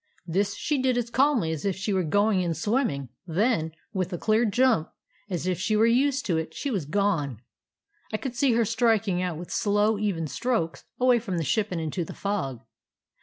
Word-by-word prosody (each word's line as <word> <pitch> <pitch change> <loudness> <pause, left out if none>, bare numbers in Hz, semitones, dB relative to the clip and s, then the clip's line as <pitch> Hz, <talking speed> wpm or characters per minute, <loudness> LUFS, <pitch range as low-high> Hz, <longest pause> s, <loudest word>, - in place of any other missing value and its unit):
"This 195 +4 0
she 295 -3 -1
did 255 -1 +2
as 240 -1 -2
calmly 260 - +2
as 155 -2 -4
if 195 -2 0
she 195 +2 -2
were 190 - +2
going 205 +4 +2
in 170 -2 -1
swimming; 210 - 0 0.2
then, 170 -2 +1 0.2
with 185 -1 -1
a 175 - -2
clear 220 +5 +2
jump, 225 -6 +2 0.4
as 180 -2 -3
if 180 -2 0
she 210 +3 +1
were 215 +1 +5
used 275 +4 +2
to 170 -4 +1
it, 160 0 -6
she 285 - -3
was 190 - -1
gone. 150 - 0 0.7
I 215 - 0
could 260 +2 -5
see 250 0 +3
her 230 0 +3
striking 225 -4 +2
out 180 -3 -2
with 175 +2 -8
slow, 205 +1 +2
even 195 -6 -1
strokes 165 - -2
away 250 -1 +4
from 195 -6 -3
the 165 - 0
ship 200 +9 +1
and 175 - -2
into 160 +3 -2
the - - -8
fog. 180 - -3
205 Hz, 205 wpm, -26 LUFS, 170-230 Hz, 0.7 s, were